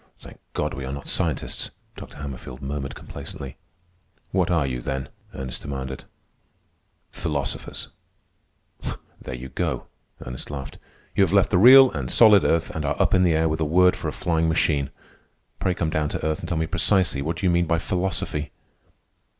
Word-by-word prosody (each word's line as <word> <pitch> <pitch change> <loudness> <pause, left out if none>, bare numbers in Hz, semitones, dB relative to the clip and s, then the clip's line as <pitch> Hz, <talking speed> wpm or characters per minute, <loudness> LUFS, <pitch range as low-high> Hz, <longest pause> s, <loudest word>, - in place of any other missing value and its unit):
"Thank - - -14
God - - -1
we 70 - -5
are 65 - -4
not 70 0 -6
scientists," - - -1 0.3
Dr. - - -10
Hammerfield 70 -3 -7
murmured 70 0 -4
complacently. 65 -2 -8 0.7
"What 90 -2 +1
are 85 -5 +2
you 60 -2 -3
then?" 65 +1 -3 0.3
Ernest 65 -1 -5
demanded. 65 -2 -5 1.1
"Philosophers." 75 -4 -3 1.3
"There 65 - -6
you 65 +2 -8
go," - - -2 0.4
Ernest 60 +1 -7
laughed. 70 -2 -7 0.4
"You 100 - +5
have 95 -1 +1
left 100 0 +4
the 90 - +4
real 130 +4 +9
and 65 -4 -4
solid 105 -4 +7
earth 85 0 +1
and 80 - -2
are 70 - -1
up - - +3
in 95 - +5
the 90 -3 +4
air 80 +1 +3
with 80 0 -1
a - - +1
word 90 +4 +4
for - - -4
a - - -1
flying 80 -1 0
machine. 75 -3 +1 0.7
Pray 90 - 0
come 80 -2 -1
down 75 -1 0
to - - -4
earth 80 -1 0
and - - -6
tell 85 - 0
me 80 - +1
precisely 80 -4 +1
what 80 +5 -3
you 95 - +4
do - - +3
mean 85 0 +2
by 85 - +2
philosophy." 85 -4 -2
80 Hz, 180 wpm, -24 LUFS, 70-90 Hz, 1.3 s, real